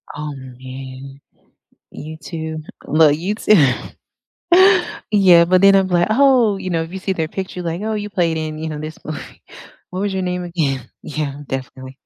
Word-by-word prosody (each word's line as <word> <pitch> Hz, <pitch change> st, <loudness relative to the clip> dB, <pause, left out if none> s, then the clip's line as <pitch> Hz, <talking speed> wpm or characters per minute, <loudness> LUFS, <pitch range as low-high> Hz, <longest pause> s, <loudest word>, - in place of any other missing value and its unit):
Oh, 150 Hz, 0 st, -5 dB
man. 130 Hz, +1 st, -10 dB, 0.7 s
You 155 Hz, +1 st, -8 dB
too? 160 Hz, +1 st, -6 dB, 0.2 s
Well, 155 Hz, 0 st, +5 dB
you 175 Hz, +8 st, -1 dB
too. 215 Hz, -, +4 dB, 1.6 s
Yeah, 185 Hz, -5 st, +6 dB
but 185 Hz, +1 st, +3 dB
then 195 Hz, 0 st, +7 dB
I'm, 195 Hz, -1 st, +3 dB
like, 175 Hz, -1 st, +2 dB
"Oh," 245 Hz, -4 st, +4 dB
you 190 Hz, -1 st, -5 dB
know, 165 Hz, -2 st, 0 dB
if 165 Hz, -, -10 dB
you 190 Hz, -, -5 dB
see 190 Hz, 0 st, -2 dB
their 160 Hz, -3 st, -2 dB
picture, 185 Hz, 0 st, -5 dB
like, 170 Hz, +2 st, -3 dB
"Oh, 220 Hz, 0 st, -2 dB
you 210 Hz, -1 st, -3 dB
played 170 Hz, -4 st, 0 dB
in, 155 Hz, -1 st, -4 dB
you 160 Hz, +1 st, -4 dB
know, 150 Hz, -1 st, -5 dB
this 155 Hz, +1 st, -7 dB
movie. 155 Hz, -, -8 dB, 0.5 s
What 185 Hz, -, -5 dB
was 200 Hz, -1 st, -1 dB
your 190 Hz, -, -2 dB
name 180 Hz, 0 st, -2 dB
again?" 145 Hz, -8 st, -2 dB
Yeah, 145 Hz, -2 st, -4 dB
definitely, 130 Hz, 0 st, -7 dB
165 Hz, 180 wpm, -19 LUFS, 145-190 Hz, 1.6 s, then